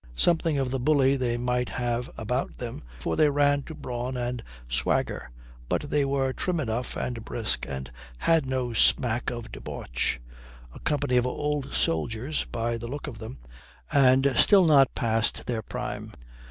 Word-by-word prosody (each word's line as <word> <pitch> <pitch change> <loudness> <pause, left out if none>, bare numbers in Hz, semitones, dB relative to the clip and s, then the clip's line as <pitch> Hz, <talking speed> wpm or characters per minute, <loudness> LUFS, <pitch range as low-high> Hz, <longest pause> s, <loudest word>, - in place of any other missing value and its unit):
Something 165 - +2
of 135 -2 0
the 135 - -1
bully 135 0 +4
they 120 -3 0
might 125 0 0
have 120 0 -2
about 125 +4 -2
them, 120 -2 -6 0.2
for 80 - -1
they 150 - +5
ran 145 0 +3
to 160 +3 -9
brawn 125 0 -4
and 120 0 -2 0.3
swagger, - - -1 0.4
but 145 - -1
they 145 -1 +3
were 135 -1 0
trim 180 +3 -1
enough 120 -3 -2
and 115 -3 -3
brisk, 115 -1 -2
and 65 -2 -5 0.3
had 165 - +3
no 130 -2 -1
smack 120 +1 +3
of 120 -2 -6
debauch - - -2 0.5
a - - -10
company 130 -4 +1
of 125 0 +3
old 145 +1 -2
soldiers, 110 - 0
by 115 0 -2
the 120 - -5
look 140 +4 -5
of 120 -7 -7
them, 110 -11 -7 0.5
and 135 0 +5
still 195 - +6
not 140 -4 +5
past 115 -1 0
their 115 -3 -2
prime. - - -5
125 Hz, 165 wpm, -27 LUFS, 115-140 Hz, 0.5 s, still